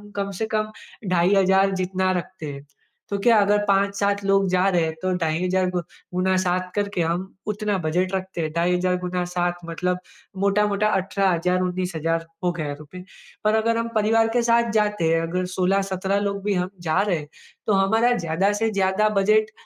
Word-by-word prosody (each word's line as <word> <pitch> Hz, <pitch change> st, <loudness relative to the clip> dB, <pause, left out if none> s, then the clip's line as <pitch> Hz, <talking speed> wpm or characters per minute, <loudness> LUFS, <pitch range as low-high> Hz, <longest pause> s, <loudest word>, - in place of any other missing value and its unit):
कम 200 Hz, 0 st, -2 dB
से 220 Hz, -, 0 dB
कम 215 Hz, -1 st, -1 dB, 0.4 s
ढाई 180 Hz, +1 st, +3 dB
हज़ार 195 Hz, 0 st, +4 dB
जितना 185 Hz, 0 st, 0 dB
रखते 180 Hz, -2 st, -7 dB
हैं, 140 Hz, 0 st, -10 dB, 0.4 s
तो 200 Hz, -, -1 dB
क्या 230 Hz, +2 st, +5 dB
अगर 205 Hz, +1 st, +3 dB
5-7 200 Hz, 0 st, +1 dB
लोग 195 Hz, 0 st, +3 dB
जा 185 Hz, +1 st, +2 dB
रहे 175 Hz, -3 st, +2 dB
हैं 160 Hz, 0 st, -1 dB
तो 185 Hz, 0 st, 0 dB
ढाई 165 Hz, 0 st, -1 dB
हज़ार 185 Hz, 0 st, +1 dB
गु 180 Hz, -1 st, -1 dB, 0.3 s
गुना 185 Hz, +1 st, +1 dB
7 180 Hz, 0 st, -1 dB
करके 200 Hz, -3 st, -1 dB
हम 175 Hz, +3 st, -2 dB
उतना 210 Hz, -1 st, -1 dB
बजट 180 Hz, +3 st, -1 dB
रखते 190 Hz, -2 st, -4 dB
हैं, 155 Hz, -1 st, -2 dB
ढाई 170 Hz, +2 st, +1 dB
हज़ार 180 Hz, 0 st, +1 dB
गुना 180 Hz, 0 st, -2 dB
7 175 Hz, 0 st, 0 dB
मतलब 180 Hz, +2 st, -2 dB, 0.4 s
मोटा-मोटा 210 Hz, +1 st, +2 dB
18 195 Hz, +1 st, 0 dB
हज़ार 180 Hz, +2 st, +1 dB
19 180 Hz, 0 st, -2 dB
हज़ार 165 Hz, +1 st, -1 dB, 0.2 s
हो 180 Hz, -, +2 dB
गया 155 Hz, -4 st, -4 dB
रुपए। 165 Hz, +5 st, -11 dB, 0.4 s
पर 215 Hz, +1 st, +3 dB
अगर 230 Hz, +1 st, +1 dB
हम 230 Hz, 0 st, -1 dB
परिवार 225 Hz, +1 st, +3 dB
के -, -, +3 dB
साथ 235 Hz, 0 st, +3 dB
जाते 210 Hz, -6 st, +1 dB
हैं, 165 Hz, -, +2 dB
अगर 180 Hz, +3 st, -2 dB
16-17 195 Hz, +1 st, +1 dB
लोग 200 Hz, 0 st, -4 dB
भी 205 Hz, -, 0 dB
हम 180 Hz, -1 st, -1 dB, 0.2 s
जा 155 Hz, -, +3 dB
रहे 200 Hz, -4 st, +1 dB
हैं, 150 Hz, -1 st, -8 dB, 0.4 s
तो 215 Hz, -, +3 dB
हमारा 220 Hz, +5 st, +3 dB
ज़्यादा 175 Hz, +3 st, +1 dB
से 225 Hz, -, +2 dB
ज़्यादा 195 Hz, +1 st, +2 dB
बजट 215 Hz, +2 st, +3 dB
190 Hz, 190 wpm, -23 LUFS, 180-200 Hz, 0.4 s, क्या